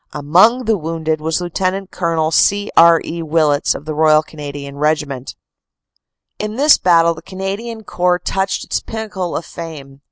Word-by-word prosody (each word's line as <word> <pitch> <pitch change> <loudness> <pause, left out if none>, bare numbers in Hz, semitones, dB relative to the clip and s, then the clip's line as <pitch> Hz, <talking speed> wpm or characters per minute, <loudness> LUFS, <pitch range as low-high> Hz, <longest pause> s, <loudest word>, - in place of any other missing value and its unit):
Among 185 - +3
the 220 -3 +1
wounded 160 -1 -3
was 160 +2 -1
Lt. 185 +2 -2
Col. 165 -3 -1
C. 205 +4 +2
R. 165 0 +7
E. 170 +1 -5
Willets 155 -2 +1
of 145 - -8
the 155 - -4
Royal 155 0 +4
Cana 150 -2 -8
dian 140 0 -8
Regiment. 150 -3 -2 1.0
In 215 0 -4
this 290 +4 +5
battle 170 -2 +4
the 160 - -12
Canadian 200 +4 -6
Corps 180 -2 0
touched 190 +2 -2
its - - -1
pinnacle 210 -6 -5
of 165 - -6
fame. 145 -5 -9
165 Hz, 160 wpm, -17 LUFS, 155-195 Hz, 1.0 s, R